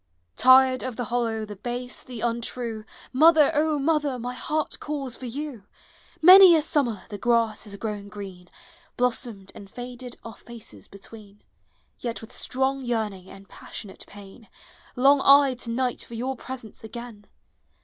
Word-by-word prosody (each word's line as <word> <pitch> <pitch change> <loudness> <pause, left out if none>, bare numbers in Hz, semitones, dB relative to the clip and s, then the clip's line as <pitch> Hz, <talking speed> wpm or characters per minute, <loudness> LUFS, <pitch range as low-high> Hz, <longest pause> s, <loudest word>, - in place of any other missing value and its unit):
Tired 260 - +5
of 255 -2 -5
the 245 - -3
hollow, 225 -3 -1
the 205 -1 -9
base, 245 +4 -6
the 245 -3 -9
untrue, 235 -1 -3 0.3
Mother, 310 +2 +6
O 305 0 +1
mother, 290 -2 0
my 245 +1 -5
heart 305 +4 -3
calls 275 -5 -5
for 255 - -8
you! 265 -4 -6 0.6
Many 370 0 +10
a 315 - +3
summer 245 -10 0
the 205 -2 -7
grass 230 -1 +1
has 200 -1 -9
grown 205 -1 -5
green, 190 -4 -10 0.5
Klossomed, 235 -5 -2
and 200 - -12
faded 245 +2 -9
our 230 -2 -10
faces 215 - -12
between, 205 +1 -14 0.6
Vet 235 -2 -4
with 225 +2 -13
strong 265 +1 -1
yearning 215 -6 -3
and 195 0 -14
passionate 200 -3 -10
pain 205 +2 -14 0.5
Long 275 +3 +5
1 275 -1 +5
to 235 - -7
night 250 +1 -2
for 235 - -10
your 255 +3 -3
presence 245 -4 -9
again. 225 -2 -10
240 Hz, 150 wpm, -25 LUFS, 215-265 Hz, 0.6 s, Many